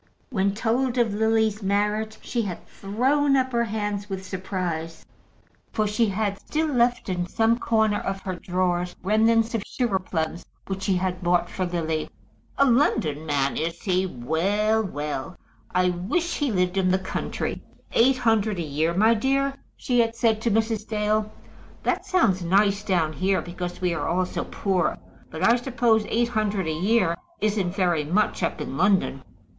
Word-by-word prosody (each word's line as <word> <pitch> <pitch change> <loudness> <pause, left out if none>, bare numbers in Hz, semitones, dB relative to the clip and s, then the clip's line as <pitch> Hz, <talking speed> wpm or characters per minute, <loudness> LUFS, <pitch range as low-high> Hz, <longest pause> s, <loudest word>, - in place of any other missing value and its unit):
When 195 -3 +1
told 245 +3 0
of 230 -4 +2
Lily's 220 0 +1
marriage, 210 +2 0
she 240 - -1
had 190 -6 -5
thrown 270 +8 +1
up 260 0 +1
her 235 -1 +1
hands 205 -2 -3
with 190 -1 -5
surprise, 180 -4 -4 0.7
for 215 - 0
she 215 +2 +1
had 200 0 -1
still 315 +1 -1
left 245 0 +2
in 180 -2 -2
some 225 +5 +2
corner 220 -3 +2
of 195 0 -3
her 185 - -3
drawers 180 0 -1
remnants 225 +3 +3
of 225 - 0
sugar 230 -6 -1
plums 170 -2 -3 0.2
which 195 0 -4
she 190 0 +1
had 180 0 -1
bought 175 0 +1
for 185 -1 -2
Lily. 160 -3 -2 0.5
"A 275 - +5
London 160 - +2
man 140 -2 0
is 165 +1 -3
he? 185 -1 +1
Well, 190 - 0
well. 150 -1 -4 0.3
I 180 0 +2
wish 230 - -1
he 290 -4 0
lived 180 -1 0
in 185 -1 +2
the 185 - +3
country. 190 0 -4 0.3
Eight 255 +3 +4
hundred 220 -4 +1
a 170 - -2
year, 155 +3 -1
my 220 +4 +5
dear?" 275 +4 +1 0.2
she 245 -1 0
had 230 -1 +2
said 225 -2 +2
to 235 - +1
Mrs. 220 0 0
Dale. 215 0 0 0.5
"That - - -1
sounds 225 - +2
nice 200 +3 +3
down 170 -6 +1
here, 190 +3 +1
because 175 0 -6
we 180 -2 +1
are 170 - -2
all 180 +2 +1
so - - -4
poor. 190 -3 0 0.3
But 160 - -5
I 235 +2 +5
suppose 235 -3 +1
eight 235 +1 +1
hundred 210 -4 0
a 160 - -1
year 185 +1 +2 0.2
isn't 200 -4 0
very 175 -6 +1
much 190 +9 0
up 170 - -1
in - - -5
London?" 190 -7 +2
200 Hz, 170 wpm, -25 LUFS, 180-225 Hz, 0.7 s, A